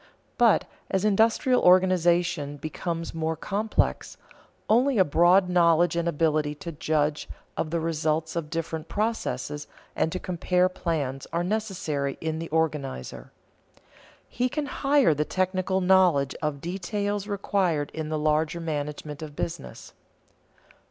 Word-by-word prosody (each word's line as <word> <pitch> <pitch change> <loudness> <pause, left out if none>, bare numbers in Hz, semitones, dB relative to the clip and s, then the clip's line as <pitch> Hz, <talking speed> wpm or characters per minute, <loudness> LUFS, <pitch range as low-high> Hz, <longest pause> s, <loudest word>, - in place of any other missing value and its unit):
But, 235 -3 +5 0.2
as 190 +1 0
industrial 225 +5 +3
organization 175 -5 +3
becomes 165 +2 -4
more 160 0 -1
complex, 210 +6 -1 0.5
only 250 +4 +3
a 190 - +5
broad 175 +5 +4
knowledge 175 -1 +3
and 170 0 0
ability 155 -2 +1
to 170 +3 -7
judge 150 -1 -1 0.3
of 155 - -2
the 170 +1 -1
results 160 0 -1
of 165 -3 -3
different 165 -1 -4
processes 200 - -2 0.3
and 160 - 0
to 185 - -2
compare 180 0 +1
plans 145 -7 -3
are 170 +1 0
necessary 180 -9 -2
in 160 0 -3
the 165 - -5
organizer. 150 - -2 1.0
He 250 +1 -1
can 300 +3 -2
hire 275 - +3
the 150 +1 0
technical 185 +2 -1
knowledge 180 -7 +4
of 150 -3 -2
details 200 +3 -3
required 190 -7 0
in 155 -1 -4
the 155 - -1
larger 155 +2 +1
management 150 -1 -4
of 150 -2 -8
business. 165 -2 -6
170 Hz, 130 wpm, -26 LUFS, 155-190 Hz, 1.0 s, But